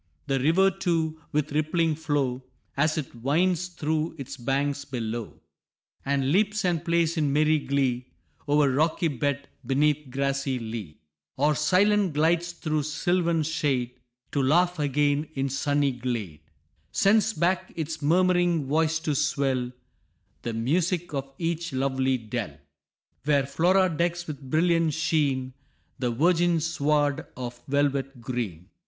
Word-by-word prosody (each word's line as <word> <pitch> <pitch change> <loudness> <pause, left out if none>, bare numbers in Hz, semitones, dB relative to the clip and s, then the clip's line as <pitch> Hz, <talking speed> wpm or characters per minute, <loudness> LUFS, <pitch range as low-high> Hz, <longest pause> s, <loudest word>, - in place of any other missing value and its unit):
The 135 -2 0
river, 175 +8 +4
too, 165 -4 -1
with 150 -1 0
rippling 155 +2 +1
flow, 145 -5 -1 0.3
As 155 +3 +1
it 150 - -4
winds 165 +9 +1
through 160 -2 -2
its 140 -1 -7
banks 140 +2 -1
below, 120 -4 -5 0.6
And 135 -1 0
leaps 210 +3 +2
and 170 -3 +1
plays 170 -1 +1
in 150 -3 +1
merry 155 +2 +3
glee, 135 -3 -1 0.4
O'er 145 -1 +3
rocky 160 +4 +1
bed, 140 +1 -2 0.2
'neath 145 +2 +1
grassy 135 0 -1
lea, 110 -9 -6 0.4
Or 150 +3 +3
silent 190 +4 +3
glides 165 +3 +2
through 155 -3 -2
sylvan 165 +2 0
shade, 140 -5 0 0.4
To 140 - +1
laugh 175 +6 +3
again 145 +1 +1
in 135 0 -1
sunny 145 +1 +1
glade, 120 - -4 0.5
Sends 215 +2 +3
back 185 +2 0
its 160 -1 -4
murm'ring 175 0 +3
voice 160 +3 +1
to 155 -2 -1
swell 135 -4 0 0.7
The 115 - -4
music 170 +8 0
of 135 -1 -3
each 170 -1 -2
lovely 130 0 +1
dell, 110 - -5 0.7
Where 145 -2 +3
Flora 185 +7 +3
decks 175 +1 -1
with 150 -3 -7
brilliant 160 +2 +2
sheen 145 -5 0 0.5
The 125 -2 0
virgin 170 +6 +2
sward 150 -2 0
of 120 -1 -6
velvet 140 -2 0
green. 115 -9 -4
150 Hz, 130 wpm, -26 LUFS, 135-165 Hz, 0.7 s, river